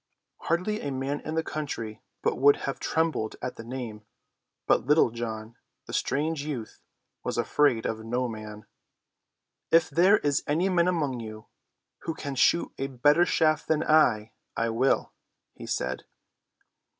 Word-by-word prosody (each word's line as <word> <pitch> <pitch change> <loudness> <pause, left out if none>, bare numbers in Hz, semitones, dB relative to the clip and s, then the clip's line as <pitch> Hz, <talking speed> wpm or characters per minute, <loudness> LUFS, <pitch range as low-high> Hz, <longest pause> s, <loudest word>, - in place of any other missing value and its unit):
Hardly 185 +6 -1
a 145 - -3
man 135 +2 -2
in 155 - -5
the 160 - +1
country 140 -9 -5 0.2
but - - 0
would 140 +2 +7
have 140 - -3
trembled 160 -9 0
at 125 - -4
the 115 - -8
name. 115 -3 -6 0.6
But - - +5
John 120 - -13
Little, 115 -6 +1 0.3
the - - -9
strange 150 +2 0
youth, 135 -7 -6 0.4
was - - -2
afraid 135 -7 +2
of 110 0 -3
no 125 +3 -1
man. 110 -2 -8 1.0
"If 165 0 +4
there 185 +5 +5
is 145 -6 0
any 170 +6 +1
man 175 -2 +3
among 150 -8 0
you 110 -1 -8 0.5
who 165 - -4
can 140 -3 -5
shoot 150 +6 +3
a 135 - -1
better 145 +7 +3
shaft 155 -1 +2
than 160 -1 +2
I, 115 -9 +3 0.3
I 115 0 +1
will," 120 +4 +1 0.4
he - - -10
said. 65 0 -2
135 Hz, 150 wpm, -27 LUFS, 115-155 Hz, 1.0 s, would